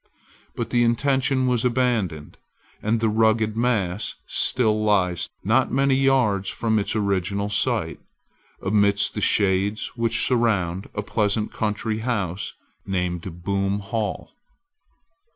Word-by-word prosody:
But 115 -1 -4
the 120 -1 +3
intention 130 +2 +1
was 125 -2 +1
abandoned, 115 -11 -1 0.4
and 110 +2 0
the 110 - +1
rugged 110 0 +2
mass 110 -5 -1
still 110 -4 +2
lies, 90 -5 +1
not 115 +6 +2
many 135 +1 +2
yards 130 -8 +2
from 110 -2 0
its 100 - -2
original 100 -1 -1
site, 100 - 0 0.6
amidst 100 0 +2
the 105 - -4
shades 100 +1 +1
which 115 -1 +2
surround 100 -7 0
a 105 - -2
pleasant 105 0 -1
country 110 0 -2
house 100 -6 -3 0.3
named 90 -2 -3
Boom 100 +1 0
Hall. 105 +1 -4
105 Hz, 115 wpm, -23 LUFS, 100-115 Hz, 0.6 s, the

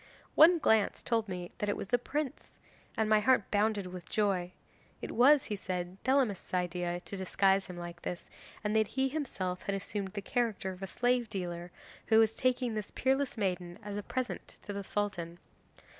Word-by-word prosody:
One 340 +3 +8
glance 220 -9 +2
told 225 -3 0
me 180 -1 -5
that 210 - -1
it 205 - 0
was 195 - -6
the 245 - +3
prince, 290 +3 -4 0.4
and 220 - +2
my 215 0 +5
heart 220 -1 +3
bounded 210 -1 +2
with 180 -2 -8
joy. 190 -4 0 0.5
It - - -5
was, 270 +4 +6
he 210 - -3
said, 180 -1 -4
Thelamis's 255 -9 +1
idea 175 -1 -1
to 200 - -7
disguise 195 +1 +2
him 180 - -8
like 175 0 -7
this, 175 - -5 0.4
and 210 0 0
that 220 -1 +4
he 265 0 +3
himself 195 -11 -3
had 200 - -2
assumed 195 0 -4
the 200 - -3
character 225 -5 -1
of 185 0 -10
a 195 - -3
slave 245 +1 +1
dealer 175 -3 -4 0.4
who 220 - +5
was 225 0 +5
taking 250 -2 +1
this 215 -2 -3
peerless 265 0 0
maiden 180 -4 -2
as 205 -1 -5
a 205 - -2
present 255 +4 -3 0.2
to 205 - -5
the 200 0 -4
Sultan. 190 -5 -2
205 Hz, 190 wpm, -32 LUFS, 185-235 Hz, 0.5 s, One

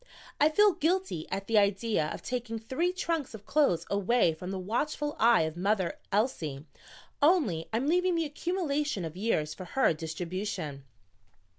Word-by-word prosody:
I 300 - +6
feel 415 +6 +5
guilty 355 - -1
at 195 +1 -3
the 220 0 +4
idea 200 -4 +1
of - - -6
taking 245 -2 -3
three 260 +11 -1
trunks 330 -8 -2
of 205 -1 -12
clothes 280 - +2
away 200 -2 +2
from 180 +3 -7
the 190 - -3
watchful 290 +10 -2
eye 230 -5 +5
of 160 0 -3
Mother 190 0 0
Elsie, 165 - -1 0.6
only 285 - +3
I'm 230 +4 0
leaving 360 +3 +2
the 330 -1 +1
accumulation 295 - -2
of 160 0 -7
years 180 -7 0
for 185 - -9
her 265 0 +2
distribution." 160 -2 -5
220 Hz, 155 wpm, -29 LUFS, 180-295 Hz, 0.6 s, I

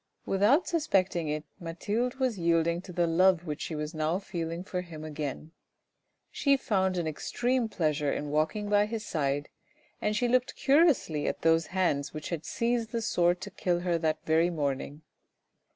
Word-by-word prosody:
Without 210 - +3
suspecting 190 - +1
it 150 0 -2 0.2
Mathilde 205 +9 -2
was 255 -6 -1
yielding 170 0 +2
to 185 - -10
the 175 -1 +1
love 175 +1 +3
which 150 -3 -4
she 160 - -4
was 150 +1 -4
now 155 +2 0
feeling 170 -3 -4
for 185 -1 -3
him 165 -3 -9
again. 155 0 -5 0.8
She 280 -1 +3
found 190 -7 0
an 170 - -1
extreme 240 - -1
pleasure 150 -6 0
in 145 -1 -3
walking 155 +8 0
by 205 0 +3
his 220 0 -4
side, 145 -4 -1 0.5
and 210 0 0
she 245 +3 +1
looked 255 +1 +1
curiously 275 - +3
at - - -3
those 165 0 +3
hands 170 -7 0
which 155 - -5
had 165 -2 -4
seized 235 -2 -1
the 230 -2 -1
sword 175 -2 +2
to 200 - -6
kill 180 -2 -1
her 175 -2 0
that 160 -1 -1
very 160 +2 +3
morning. 145 -1 -3
175 Hz, 170 wpm, -29 LUFS, 155-210 Hz, 0.8 s, Without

